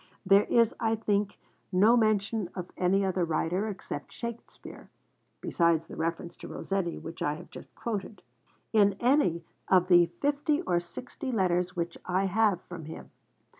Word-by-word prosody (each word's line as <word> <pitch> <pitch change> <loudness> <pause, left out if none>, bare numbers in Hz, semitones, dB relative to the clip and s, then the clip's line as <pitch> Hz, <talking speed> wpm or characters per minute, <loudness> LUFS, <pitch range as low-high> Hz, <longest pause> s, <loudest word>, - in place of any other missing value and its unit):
There 195 +2 +5
is, 230 -1 +3
I 225 0 +1
think, 205 -2 -1 0.3
no 205 +6 +5
mention 215 -3 +1
of 180 -1 -6
any 195 +2 +2
other 185 -1 0
writer 170 +5 0
except 200 -3 -6
Shakespeare 235 -1 -8 0.5
(besides 170 -2 +2
the - - -10
reference 165 +2 -3
to - - -9
Rossetti 195 -3 -3
which 165 +1 -9
I 145 - 0
have 175 - -12
just - - -12
quoted) 210 -2 -5 0.5
in 200 -2 +4
any 240 - +2 0.2
of 185 -1 +4
the 175 -1 +7
fifty 295 +3 +1
or 175 - +1
sixty 250 - -7
letters 180 -4 +1
which 170 -1 -3
I 185 +2 0
have 200 -1 +2
from 170 -3 -9
him. 160 - -9
190 Hz, 155 wpm, -29 LUFS, 175-220 Hz, 0.5 s, the